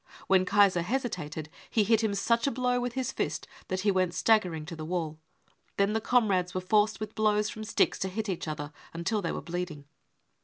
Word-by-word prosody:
When 190 -1 +4
Kaiser 200 -2 +4
hesitated, 175 - -3 0.2
he 220 - +3
hit 225 +2 +3
him 210 -2 +1
such 230 +5 +2
a - - +2
blow 250 0 +1
with 245 -1 -2
his 260 -2 -2
fist - - -3 0.2
that 185 0 -2
he 205 +1 +3
went 185 -2 +1
staggering 180 -9 +2
to 165 +1 -7
the 155 - -6
wall. 160 -2 -3 0.6
Then 200 +1 +2
the 220 - 0
comrades 200 -7 +2
were - - +1
forced 210 +2 +2
with 215 0 -5
blows 210 -1 +2
from 215 - -7
sticks 215 - +1
to 190 - -1
hit 215 +3 -3
each 180 -4 -3
other 150 -1 -5 0.2
until 195 +6 -1
they 165 - -2
were - - -4
bleeding. 170 -4 -4
200 Hz, 205 wpm, -29 LUFS, 175-220 Hz, 0.6 s, When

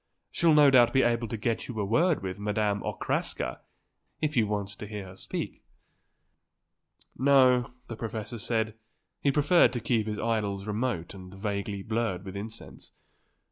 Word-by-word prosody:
She'll 165 -2 +4
no 145 -2 +7
doubt 120 -2 +6
be 130 - +4
able 120 0 +1
to 115 - -4
get 115 +1 -2
you 120 -4 -5
a 100 - 0
word 155 - +2
with 95 +1 -4
Madame 105 0 0
Okraska, - - -2 0.6
if 155 -1 -1
you 115 -4 +3
want 100 -1 -2
to 105 +1 -8
hear 105 -2 -6
her 95 0 -11
speak." - - -5 1.5
No, 130 -2 +4 0.2
the 115 - -6
professor 110 0 -5
said, 110 0 0 0.5
he 140 - +3
preferred 150 +5 +5
to 120 - -1
keep 115 -1 0
his 105 -1 -2
idols 105 -4 -1
remote 105 -5 -2
and 90 -2 -11
vaguely 100 0 -3
blurred 110 -4 -2
with 95 0 -7
incense. 110 +3 -8
110 Hz, 160 wpm, -28 LUFS, 100-120 Hz, 1.5 s, no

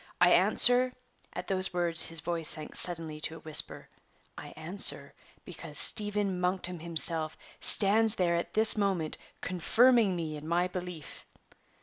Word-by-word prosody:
I - - +3
answer" 250 +1 +4 0.4
(at - - -8
those 185 -1 -2
words 170 -2 +2
his 165 -1 +4
voice 165 -1 -5
sank 155 -1 -2
suddenly 160 -3 -3
to 160 - -3
a - - -13
whisper), 155 -1 0 0.5
"I - - -12
answer, 175 +6 +1 0.3
because - - -9
Stephen 205 -3 -1
Monkton 180 -1 -4
himself 160 -1 -2 0.2
stands 220 +2 +5
there 175 -4 -2
at 170 - -6
this 220 +1 +3
moment 195 -7 -4 0.2
confirming 220 +3 0
me 160 -3 -7
in 150 +1 -12
my 175 +2 -2
belief." 180 -4 -10
175 Hz, 140 wpm, -27 LUFS, 165-200 Hz, 0.5 s, stands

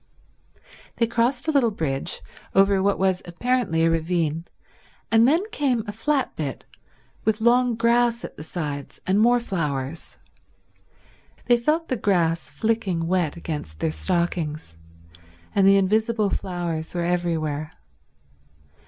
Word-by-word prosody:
They 230 - +2
crossed 240 +4 0
a - - +3
little 275 -6 +3
bridge, 145 -9 -2 0.3
over 195 0 +4
what 200 +1 +2
was 190 -1 +1
apparently 180 -2 0
a - - +4
ravine, 165 -1 -1 0.7
and 225 +1 +6
then 325 +7 +3
came 260 - 0
a 205 - -4
flat 270 +6 -1
bit 145 -4 -4 0.6
with 220 0 +1
long 240 +1 +3
grass 235 +1 +2
at - - -10
the - - -10
sides 150 -3 -5
and 190 +2 +2
more 240 +2 +5
flowers. 155 - -4 1.3
They 240 - +5
felt 305 +8 0
the 255 - -1
grass 170 -6 +1
flicking 210 -7 -1
wet 175 -2 0
against 150 - -6
their 80 - -1
stockings, 155 - -2 0.8
and 195 -1 +4
the 195 0 +7
invisible 215 +1 +1
flowers 175 -3 -3
were 170 -1 0
everywhere. 160 -3 -1
190 Hz, 130 wpm, -24 LUFS, 165-230 Hz, 1.3 s, the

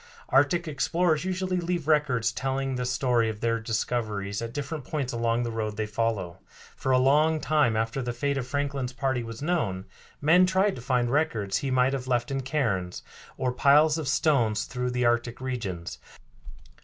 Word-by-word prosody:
Arctic 155 +6 +3
explorers 160 +1 +1
usually 185 0 -1
leave 175 -3 -2
records 135 -7 +2
telling 135 +1 -2
the 125 -1 -2
story 125 -2 +1
of 105 -1 -5
their 115 0 0
discoveries 110 -3 -2
at 115 0 -4
different 145 +2 -5
points 135 -2 -3
along 115 0 0
the 120 - -3
road 110 -2 -3
they 110 - -1
follow. 105 -5 -2 0.4
For 130 - -2
a 130 - +5
long 150 +5 +3
time 150 -6 +2
after 115 +4 -1
the 120 -1 -2
fate 140 +4 -1
of 130 -2 -3
Franklin's 140 -2 -2
party 130 -1 -1
was 115 +2 -7
known, 115 - -1 0.3
men 175 +5 +5
tried 190 +2 +2
to - - -8
find 125 -1 0
records 110 -10 0
he 140 - -3
might 130 +1 +2
have 130 -2 -4
left 120 0 0
in 135 0 -1
cairns, 115 -11 -2 0.3
or 125 -1 0
piles 150 +5 +4
of 155 - -4
stones 130 -8 +2
through 125 -1 -3
the 125 0 0
Arctic 120 0 +1
regions. 100 - -5
125 Hz, 180 wpm, -27 LUFS, 115-145 Hz, 0.4 s, a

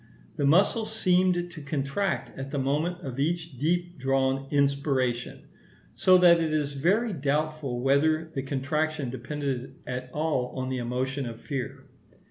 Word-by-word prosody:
The 140 - +1
muscle 200 +8 +4
seemed 180 -4 +1
to 155 - -9
contract 145 +6 -2
at 135 +1 -6
the 145 - -3
moment 150 +7 0
of 135 -5 -6
each 160 -2 -1
deep 175 +3 0
drawn 135 +1 +1
inspiration; 140 -4 0 0.5
so 185 +11 +5
that 175 -2 +7
it 160 -1 0
is 150 -2 0
very 195 - +1
doubtful 145 -3 -1
whether 155 +4 +3
the 135 - -2
contraction 140 +1 -1
depended 135 -1 -4
at 125 0 -5
all 145 -5 -1
on 130 0 -2
the 130 -1 -2
emotion 130 +2 -2
of 115 -1 -7
fear. 135 -4 -5
145 Hz, 145 wpm, -27 LUFS, 135-165 Hz, 0.5 s, that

